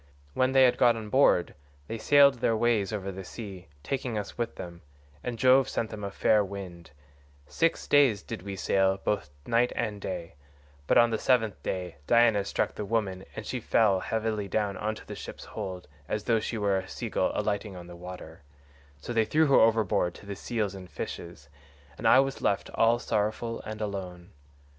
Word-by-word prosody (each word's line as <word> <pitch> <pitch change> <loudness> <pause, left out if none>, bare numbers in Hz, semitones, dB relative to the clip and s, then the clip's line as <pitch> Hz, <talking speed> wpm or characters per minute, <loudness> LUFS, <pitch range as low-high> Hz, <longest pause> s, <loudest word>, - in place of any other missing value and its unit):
When 130 - +1
they 135 -1 +6
had 125 - +4
got 120 -1 +5
on 110 -2 -6
board 120 -8 +3 0.3
they 115 - -5
sailed 140 -2 +5
their 115 -1 +1
ways 110 -3 +1
over 100 -2 -3
the 95 0 -7
sea, 95 -4 -9 0.2
taking 125 - -3
us 105 - -5
with 120 -1 -3
them, 85 -1 -9 0.4
and 120 -1 -4
Jove 130 +2 +5
sent 110 - -2
then 105 -1 -7
a 100 - -2
fair 105 +1 +3
wind; 95 -4 -8 0.6
six 165 - 0
days 135 -8 +4
did - - -6
we 100 +1 -6
sail 95 0 +2
both 100 -5 -2 0.2
night 120 +1 +2
and 105 -3 -3
day, 85 -3 -5 0.5
but - - +4
on 120 0 +5
the 110 - -1
seventh 110 - +1
day 90 -3 -4
Diana 115 -4 +4
struck - - -1
the - - -5
woman 100 -3 -2
and 110 - -6
she 130 - -3
fell 105 -4 +3
heavily 110 0 -2
down 100 0 -1
into 110 +2 -4
the - - -7
ship's - - -8
hold 90 -1 -6 0.2
as 105 - -2
though 115 -1 +2
she 115 +2 -4
were 100 -2 +1
a 95 - -8
sea - - -5
gull - - +1
alighting 100 -1 -2
on 90 -1 -9
the 85 0 -11
water; 90 -1 -10 0.6
so 70 +12 -6
they 115 -1 +3
threw 155 +8 +3
her 140 - +5
overboard 110 -6 +2
to - - -13
the 100 0 -5
seals 105 -2 -2
and 95 -2 -10
fishes, 85 -4 -7 0.5
and - - -1
I 130 - +7
was 135 0 -3
left 100 - 0
all 115 +1 +4
sorrowful 115 0 -2
and 110 0 -6
alone. 95 -3 -5
105 Hz, 195 wpm, -28 LUFS, 95-115 Hz, 0.6 s, I